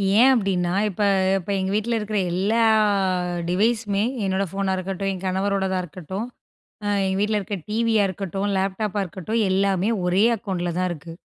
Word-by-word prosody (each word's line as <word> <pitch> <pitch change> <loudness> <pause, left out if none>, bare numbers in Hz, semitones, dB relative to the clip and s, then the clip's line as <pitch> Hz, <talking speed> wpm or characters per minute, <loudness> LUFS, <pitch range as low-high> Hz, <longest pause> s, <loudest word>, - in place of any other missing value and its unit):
ஏன் 245 +5 +7
அப்பிடின்னா, 190 -6 0 0.2
இப்ப 200 +1 -5 0.4
இப்ப 190 0 -7
எங்க 190 0 -1
வீட்ல 230 +2 0
இருக்கிற 210 0 -3 0.2
எல்லா 200 +6 +1 0.9
டிவைஸுமே 210 +1 +1 0.2
என்னோட 190 0 0
ஃபோனா 195 -1 -1
இருக்கட்டும், 195 +1 -2
என் 185 0 -8
கணவரோடதா 190 0 0
இருக்கட்டும், 185 +6 -6 0.6
அ - - -1 0.2
எங்க 190 0 -1
வீட்ல 210 0 +1
இருக்க 200 +1 -4
டிவியா 220 -1 +2
இருக்கட்டும், 195 +1 -3
லேப்டாப்பா 195 +2 -1
இருக்கட்டும். 195 +6 -2
எல்லாமே 195 +2 +1 0.2
ஒரே 185 +3 +3
அக்கௌண்ட்ல 180 -4 -3
தான் 185 0 +1
இருக்கு. 165 0 -8
195 Hz, 150 wpm, -23 LUFS, 185-210 Hz, 0.9 s, ஏன்